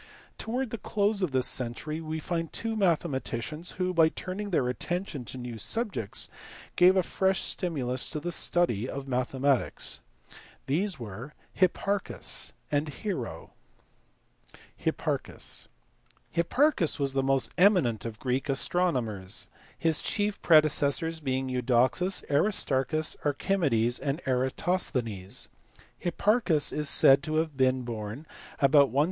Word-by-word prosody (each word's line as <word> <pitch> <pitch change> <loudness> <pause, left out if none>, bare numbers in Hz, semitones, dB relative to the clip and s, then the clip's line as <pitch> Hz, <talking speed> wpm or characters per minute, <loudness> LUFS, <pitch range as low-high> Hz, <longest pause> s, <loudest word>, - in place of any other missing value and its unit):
Towards 245 +1 -3
the 230 - -4
close 205 +1 0
of 185 - +1
this 130 -1 +2
century 135 +6 -1
we 160 0 -4
find 165 0 -3
two 225 -1 -2
mathema 170 -8 +1
ticians 150 +9 -3
who, 185 0 -2
by 165 -2 +5
turning 190 +5 -5
their 145 -9 +1
attention 165 +1 -3
to 130 - -6
new 120 -2 -6
subjects, 205 - 0 0.5
gave 185 +2 +6
a 185 - +3
fresh 190 +1 +1
stimulus 130 -8 -1
to 155 - -4
the 175 +3 -4
study 130 - +2
of 140 0 -6
mathematics. 130 +1 0 0.7
These 175 +4 -1
were 115 +6 -8 0.2
Hipparchus 195 +2 0 0.2
and 145 +1 0
Hero. 160 - -5 1.2
Hipparchus*. - - -3 0.6
Hipparchus 170 - +2
was 140 -2 -1
the 135 - +1
most 135 0 +1
eminent 175 - +4
of 115 -2 -6
Greek 130 +4 -2
astronomers 125 - 0 0.3
his 160 -2 +3
chief 205 -1 -1
predecessors 155 +1 +3
being 130 -3 -2
Eudoxus, 125 +8 +2
Aristarchus, 150 -2 +1
Archimedes, 140 - +1
and 140 +2 -2
Eratosthenes. 125 - -1 0.5
Hipparchus 185 -3 +1
is 150 -1 +1
said 135 0 +6
to 155 +2 -3
have 160 -2 0
been 130 -1 +2
born 115 +4 -6 0.3
about 140 -2 +5
160B. 135 - +1
150 Hz, 125 wpm, -28 LUFS, 130-180 Hz, 1.2 s, gave